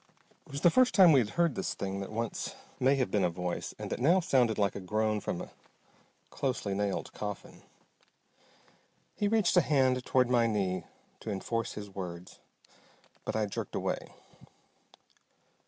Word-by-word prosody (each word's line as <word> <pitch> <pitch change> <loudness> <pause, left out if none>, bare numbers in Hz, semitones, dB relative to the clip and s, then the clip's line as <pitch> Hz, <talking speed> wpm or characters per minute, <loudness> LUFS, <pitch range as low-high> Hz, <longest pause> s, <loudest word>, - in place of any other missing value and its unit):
It - - -15
was 140 0 -4
the 175 - +6
first 255 +4 +4
time 185 -4 +8
we 140 - +6
had 110 -4 0
heard 170 -4 +3
this - - -3
thing 95 0 -3
that 100 - -6
once 115 0 -3 0.2
may 135 +2 +4
have 130 -2 0
been 105 -2 +2
a 90 - +3
voice 90 +1 -4
and - - -6
that - - -2
now 165 +9 +4
sounded 125 - +2
like 100 -2 +1
a - - -4
groan 105 +3 0
from 90 - -3
a - - -9 0.8
closely 125 -7 -2
nailed 100 0 -2
coffin. 105 -2 -6 1.5
He 205 - 0
reached 215 -4 +2
a - - +8
hand 130 -4 +2
toward 130 -1 +3
my 120 -2 +3
knee 95 -4 -1 0.3
to - - -7
enforce 115 +4 -2
his 105 -1 -7
words, 90 -2 -7 0.9
but - - -3
I 110 -1 +1
jerked 100 - -5
away. - - -3
115 Hz, 170 wpm, -30 LUFS, 100-135 Hz, 1.5 s, time